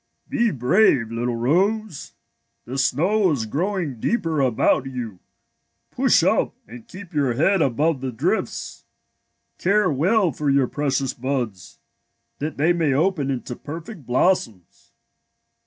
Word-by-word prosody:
'' -, -, -49 dB
Be 235 Hz, -1 st, +2 dB
brave, 125 Hz, -, +2 dB
little 120 Hz, +1 st, -2 dB
rose. 185 Hz, -, 0 dB, 0.5 s
The 130 Hz, +3 st, -4 dB
snow 185 Hz, +10 st, +2 dB
is 135 Hz, -8 st, -1 dB
grow 180 Hz, -, -2 dB
ing 145 Hz, -10 st, -4 dB
deeper 165 Hz, -, 0 dB
about 130 Hz, +1 st, +2 dB
you. 120 Hz, -7 st, -6 dB, 0.7 s
Push -, -, +3 dB
up -, -, +1 dB
and 120 Hz, 0 st, -12 dB
keep 185 Hz, -2 st, -11 dB
your 140 Hz, -5 st, +1 dB
head 185 Hz, +7 st, +2 dB
above 145 Hz, +2 st, +1 dB
the 130 Hz, -1 st, -3 dB
drifts. 115 Hz, -, -3 dB, 0.7 s
Care 200 Hz, -1 st, +2 dB
well 180 Hz, -, +2 dB
for 145 Hz, +2 st, -2 dB
your 135 Hz, -1 st, +3 dB
precious 135 Hz, -1 st, -1 dB
buds, 120 Hz, -8 st, -4 dB, 0.6 s
that 155 Hz, +2 st, -4 dB
they 160 Hz, +5 st, +3 dB
may 160 Hz, -5 st, +1 dB
open 155 Hz, -1 st, +1 dB
into 125 Hz, -2 st, -4 dB
perfect 165 Hz, -, -9 dB
blossoms. 120 Hz, -, -1 dB
140 Hz, 135 wpm, -22 LUFS, 125-180 Hz, 0.7 s, Push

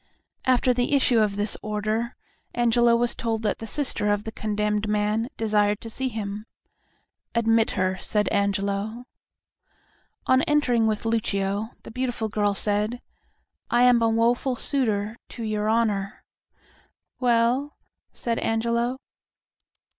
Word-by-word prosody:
After 255 Hz, 0 st, +3 dB
the 245 Hz, +3 st, +1 dB
issue 255 Hz, -4 st, +3 dB
of 210 Hz, -2 st, +1 dB
this 205 Hz, 0 st, +1 dB
order 215 Hz, +3 st, -2 dB, 0.4 s
Angelo 240 Hz, 0 st, +4 dB
was 240 Hz, 0 st, +1 dB
told 225 Hz, -1 st, -2 dB
that 210 Hz, -, -1 dB
the 225 Hz, -, -6 dB
sister 220 Hz, -5 st, 0 dB
of 205 Hz, 0 st, 0 dB
the 220 Hz, -, -5 dB
condemned 210 Hz, -1 st, -1 dB
man 210 Hz, +3 st, 0 dB
desired 210 Hz, -2 st, +1 dB
to 225 Hz, -, -8 dB
see 265 Hz, +3 st, -2 dB
him. 210 Hz, -1 st, -5 dB, 0.9 s
"Admit 225 Hz, -1 st, +3 dB
her," 185 Hz, 0 st, 0 dB
said 210 Hz, -1 st, 0 dB
Angelo. 200 Hz, +3 st, -1 dB, 1.2 s
On 260 Hz, 0 st, +4 dB
entering 250 Hz, -7 st, +2 dB
with 215 Hz, 0 st, -1 dB
Lucio, 210 Hz, -2 st, -1 dB
the -, -, -10 dB
beautiful 245 Hz, -2 st, -2 dB
girl 205 Hz, -1 st, 0 dB
said, 210 Hz, +4 st, -1 dB, 0.7 s
"I 240 Hz, +1 st, +3 dB
am 245 Hz, -1 st, +5 dB
a 230 Hz, -, +3 dB
woeful 240 Hz, +3 st, +1 dB
suitor 225 Hz, -5 st, 0 dB
to 235 Hz, -, -7 dB
your 215 Hz, -1 st, -1 dB
Honor." 210 Hz, -3 st, 0 dB, 1.0 s
"Well?" 245 Hz, +3 st, +1 dB, 0.3 s
said 230 Hz, -1 st, -2 dB
Angelo. 235 Hz, +2 st, 0 dB
225 Hz, 130 wpm, -25 LUFS, 210-240 Hz, 1.2 s, am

